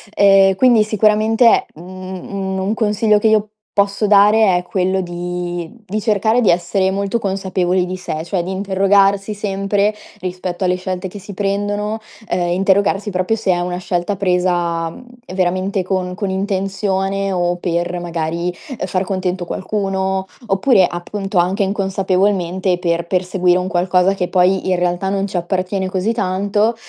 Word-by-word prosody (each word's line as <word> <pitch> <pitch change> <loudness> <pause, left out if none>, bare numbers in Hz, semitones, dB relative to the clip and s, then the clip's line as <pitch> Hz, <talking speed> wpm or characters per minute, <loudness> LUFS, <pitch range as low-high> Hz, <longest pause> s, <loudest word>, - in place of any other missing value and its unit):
Ehm, 195 -1 +5
quindi 235 -1 +5
sicuramente, 215 +2 +3
mhmm, 185 +3 -9
un 190 -1 -3
un 195 +3 -1
consiglio 210 -1 +2
che 220 - +2
io 215 -1 +3 0.3
posso 200 +1 +1
dare 205 -1 +5
è 180 - -3
quello 190 +1 0
di 175 +1 -5
di 210 +3 -3
cercare 220 +2 +2
di 215 - +3
essere 185 +2 +1
molto 200 +4 -1
consapevoli 190 -2 0
di 185 +1 -4
sé, 160 -4 -4
cioè 175 +1 -1
di 185 - -4
interrogarsi 195 +1 +2
sempre 200 +1 0 0.3
rispetto 180 0 -3
alle 180 0 +2
scelte 185 0 -4
che 200 +2 -9
si 200 +1 -10
prendono, 205 +2 -2 0.3
ehm, 175 -1 0
interrogarsi 195 +2 +1
proprio 185 +4 0
se 205 -3 0
è 175 - +1
una 180 0 -3
scelta 180 +2 -2
presa, 175 -3 0
mhmm, 205 - -12 0.2
ehm, 185 - -8
veramente 185 +1 0
con 185 -1 -2
con 200 0 -3
intenzione 195 0 -1
o 175 -1 0
per, 175 0 -2
magari, 170 0 -2 0.3
ehm, - - -3
far 185 +1 -1
contento 185 -1 -2
qualcuno 190 0 -2 0.2
oppure, 195 0 +4
appunto, 195 +2 -4
anche 185 +4 +1
inconsapevolmente, 190 -2 0
per 170 -1 -1
perseguire 180 -1 +1
un 180 - -3
qualcosa 180 +1 +2
che 180 -2 -1
poi 185 +1 +2
in 185 - +3
realtà 175 +1 -1
non 195 0 -1
ci 190 - -4
appartiene 185 +2 -1
così 190 +4 0
tanto. 205 +2 0
190 Hz, 155 wpm, -18 LUFS, 180-200 Hz, 0.3 s, Ehm